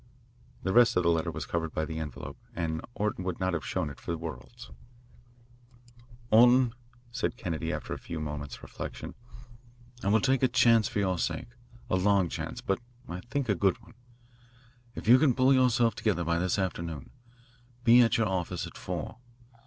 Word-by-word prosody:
The 95 - 0
rest 120 -4 +5
of 90 - +3
the 85 - +3
letter 80 -1 0
was - - -5
covered 80 -2 -3
by 80 - 0
the 80 0 -5
envelope, 70 -4 -7 0.2
and 80 -2 -2
Orton 105 -3 -1
would 90 -2 -3
not 95 0 0
have 80 -4 -2
shown 75 +1 -2
it 70 - -12
for 85 -1 -4
worlds. 70 -5 -9 1.6
"Orton," 120 +2 +6 0.4
said 125 +1 -2
Kennedy, 85 -4 -3
after - - -4
a - - -6
few 85 - -6
moments' 75 -3 -6
reflection, - - -7 0.9
"I - - -1
will 110 +3 +4
take 130 +2 +2
a 130 - +5
chance 115 -3 +4
for 120 - -5
your 95 -3 +1
sake 85 +8 -2 0.4
a 95 - +1
long 95 -2 +3
chance, - - -5
but 95 - -1 0.3
I 90 - -5
think 140 -1 -1
a 105 - +3
good 95 0 +1
one. - - -17 1.0
If - - -7
you 125 +3 +8
can 140 -4 +3
pull 130 +1 +5
yourself 125 -3 +3
together 95 -6 0
by 85 0 0
this 90 +2 0
afternoon, 85 -6 -3 0.7
be 120 0 +7
over 120 - +8
at 115 - +1
your 115 -2 +2
office 95 -3 -2
at - - -10
four. - - -5
95 Hz, 185 wpm, -29 LUFS, 85-115 Hz, 1.6 s, you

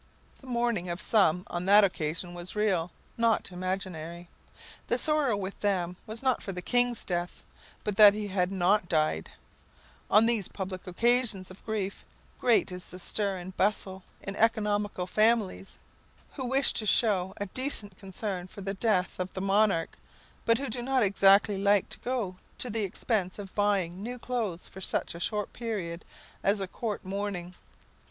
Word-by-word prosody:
The 265 - -15
mourning 235 -7 0
of 175 +1 -3
some 180 -6 +3
on 175 +1 -4
that 205 +1 +8
occasion 175 -1 -1
was 175 +2 -6
real, 190 -5 +1 0.3
not 230 -4 +1
imaginary. 180 -2 -5 0.6
The - - +1
sorrow 300 -8 +2
with 195 0 -5
them 180 -4 0
was 220 +3 -5
not 260 -2 +2
for 195 - -5
the 180 -1 -6
kings' 245 -1 +2
death, 175 -1 -3 0.4
but 210 -2 -2
that 210 -1 +9
he 210 -1 -4
had 185 -1 0
not 190 0 +2
died. 155 - +1 0.8
On 215 +2 +6
these 225 -5 +1
public 190 -2 -6
occasions 215 -1 +2
of 185 - -14
grief, 205 -3 -3 0.4
great 235 -5 +3
is 180 0 -3
the 180 - -9
stir 195 +1 0
and 185 +1 -8
bustle 190 -1 0 0.2
in 195 - -5
economical 210 -4 +1
families, 215 0 +1 0.6
who 265 - -5
wish 270 +2 +3
to 215 - -1
show 190 -4 +2
a 205 - -3
decent 210 -3 0
concern 190 -2 -4
for 200 - -11
the 195 0 -3
death 190 -4 0
of 185 0 -3
the - - -4
monarch, 195 -3 +1 0.5
but 230 0 +4
who 275 +2 -4
do 240 +2 -4
not 260 0 +2
exactly 200 0 +4
like 200 -1 +3
to - - -8
go 235 -8 -3 0.2
to 250 - -2
the 220 0 0
expense 195 -1 -1
of 200 -2 -8
buying 195 -3 0
new 245 +4 -5
clothes 230 -8 -3
for 190 - -11
such - - -1
a 170 - -8
short 210 +3 -2
period 195 -8 -4 0.4
as 200 +1 +2
a 195 - -2
court 210 +1 -4
mourning. 190 -2 -4
200 Hz, 170 wpm, -29 LUFS, 180-220 Hz, 0.8 s, that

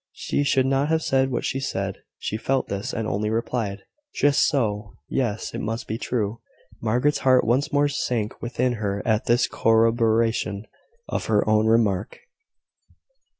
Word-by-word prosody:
She 145 - -1
should 135 -2 +2
not 135 +2 +1
have 160 0 +1
said 135 0 +2
what 125 - -2
she 135 - -2
had; 95 0 -3 0.2
she - - -4
felt 130 +4 -1
this, 100 +6 -3
and 115 -2 -3
only 105 +1 -1
replied 110 -3 -2 0.3
"Just 145 0 +3
so. 105 -6 -1
Yes; 115 -5 -2
it - - -4
must 115 +1 -3
be 110 +2 -3
true." 115 -3 -2 0.4
Margaret's 125 +6 +1
heart 130 -1 +4
once 135 +7 +1
more 145 0 +3
sank 120 -6 -2
within 125 +1 0
her 100 -1 -2
at 110 -1 +1
this 120 +1 +3
corroboration 115 -2 +2 0.4
of - - -3
her 105 -1 +2
own 110 0 +3
remark. 110 -3 +1
115 Hz, 155 wpm, -24 LUFS, 105-130 Hz, 0.4 s, heart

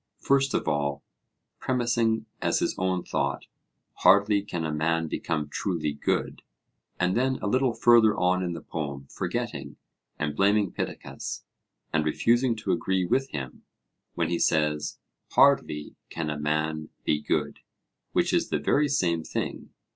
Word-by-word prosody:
First 135 0 +2
of - - -1
all, 70 -2 -1 0.6
premising 120 -3 +1 0.2
as - - +1
his - - 0
own 95 -1 0
thought, - - -2 0.5
'Hardly 100 +1 +5
can 85 -5 -4
a 80 - -2
man 80 +2 0
become 80 -1 -2
truly 75 -1 -2
good'; 70 - -2 0.6
and 90 +1 +1
then 130 +2 +2
a - - -5
little 125 +3 +2
further 115 -3 +5
on 90 +1 +2
in 90 -2 -2
the 80 - -7
poem, 70 -3 -5
forgetting, - - -4 0.4
and 75 -1 -2
blaming 100 +1 +3
Pittacus - - -5 0.5
and 80 -1 +2
refusing 120 +10 +2
to 110 - -2
agree 95 -1 +1
with 135 +9 +1
him, 65 -4 -6 0.5
when 85 -1 0
he 85 - 0
says, 75 -1 +1 0.4
'Hardly 75 0 +3
can 80 -2 -3
a 75 - -4
man 75 +1 -1 0.2
be 75 - +1
good,' - - -1 0.5
which - - +1
is - - +1
the - - +1
very 150 +1 +2
same 85 - +1
thing. - - -4
85 Hz, 145 wpm, -27 LUFS, 75-110 Hz, 0.6 s, Hardly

